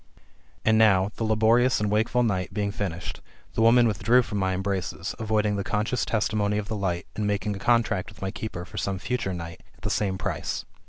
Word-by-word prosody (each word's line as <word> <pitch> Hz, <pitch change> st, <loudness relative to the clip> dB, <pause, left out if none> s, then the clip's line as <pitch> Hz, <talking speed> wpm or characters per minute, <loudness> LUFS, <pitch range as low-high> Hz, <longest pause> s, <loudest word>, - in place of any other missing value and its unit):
And 110 Hz, 0 st, +4 dB
now, 100 Hz, -3 st, +4 dB
the -, -, -2 dB
laborious 110 Hz, +3 st, +3 dB
and 105 Hz, -1 st, 0 dB
wakeful 110 Hz, +3 st, +2 dB
night 95 Hz, -6 st, -1 dB
being 100 Hz, -1 st, 0 dB
finished, 90 Hz, -4 st, -4 dB, 0.3 s
the -, -, 0 dB
woman 120 Hz, +1 st, +6 dB
withdrew 115 Hz, +4 st, +3 dB
from 105 Hz, -3 st, -3 dB
my 95 Hz, -1 st, +1 dB
embraces, 95 Hz, -3 st, -3 dB
avoiding 105 Hz, -2 st, +1 dB
the 100 Hz, -, -1 dB
conscious 110 Hz, +4 st, -1 dB
testimony 105 Hz, -2 st, 0 dB
of 105 Hz, -1 st, -3 dB
the 110 Hz, -, -2 dB
light, 90 Hz, -3 st, -2 dB
and 105 Hz, -1 st, -1 dB
making 105 Hz, 0 st, -1 dB
a -, -, -7 dB
contract 115 Hz, -4 st, +1 dB
with 105 Hz, -, -15 dB
my 95 Hz, 0 st, -3 dB
keeper 90 Hz, -5 st, -6 dB
for -, -, -11 dB
some 100 Hz, -1 st, -1 dB
future 105 Hz, 0 st, -2 dB
night, 85 Hz, -2 st, -6 dB
at -, -, -25 dB
the -, -, -1 dB
same 95 Hz, -3 st, 0 dB
price. -, -, -3 dB
105 Hz, 205 wpm, -26 LUFS, 95-110 Hz, 0.3 s, woman